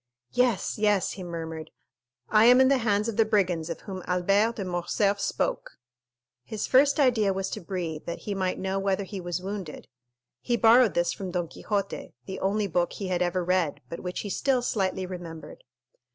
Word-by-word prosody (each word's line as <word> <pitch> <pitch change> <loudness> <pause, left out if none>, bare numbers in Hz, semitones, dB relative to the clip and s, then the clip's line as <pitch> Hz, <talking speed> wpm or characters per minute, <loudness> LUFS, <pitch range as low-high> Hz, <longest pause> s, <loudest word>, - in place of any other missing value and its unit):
"Yes, 245 -5 +1
yes," 210 -3 +2
he 195 - -8
murmured, 165 -2 -6 0.6
"I 215 +1 +5
am 250 +2 +7
in 260 0 +6
the 275 -1 +3
hands 210 -2 +1
of 230 - -3
the 225 - +6
brigands 185 -7 0
of 165 - -5
whom 190 -2 -7
Albert 195 +6 +2
de 200 - -4
Morcerf 185 +3 0
spoke." - - -2 0.7
His 205 - -4
first 280 +3 +4
idea 235 -7 +3
was 190 0 -3
to - - -4
breathe, 170 -4 -4
that 170 - -5
he 205 - -2
might 185 -1 -1
know 190 +1 -2
whether 195 0 0
he 195 0 -7
was 175 +1 -4
wounded. 195 -5 -6 0.5
He 240 -1 0
borrowed 230 -4 +5
this 175 0 +1
from 190 -2 -6
Don 175 -1 -2
Quixote, 200 +3 -4
the 190 -1 -6
only 205 +2 0
book 175 -2 0
he 195 -2 -5
had 180 -1 0
ever 180 0 0
read, 180 -5 +1
but 170 - -6
which 180 0 -4
he 205 - -6
still 255 +4 +1
slightly 190 -5 -1
remembered. 175 -3 -9
190 Hz, 190 wpm, -27 LUFS, 175-215 Hz, 0.7 s, am